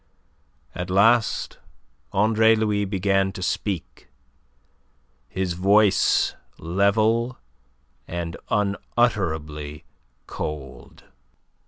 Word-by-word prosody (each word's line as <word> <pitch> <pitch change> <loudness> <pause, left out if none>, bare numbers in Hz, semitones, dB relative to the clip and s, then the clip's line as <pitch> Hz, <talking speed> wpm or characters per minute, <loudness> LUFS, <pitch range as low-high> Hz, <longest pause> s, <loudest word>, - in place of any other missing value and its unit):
At 90 +1 -5
last 110 +5 +2 0.5
Andre 110 +2 +4
Louis 105 -2 0
began 95 0 +1
to 95 - -6
speak, 95 -3 -3 1.2
his 95 -2 -2
voice 100 +3 +3 0.2
level 110 +7 +1 0.7
and 85 -1 -4
unutterably 80 -8 -1 0.4
cold. 70 -5 -7
95 Hz, 65 wpm, -23 LUFS, 85-110 Hz, 1.2 s, Andre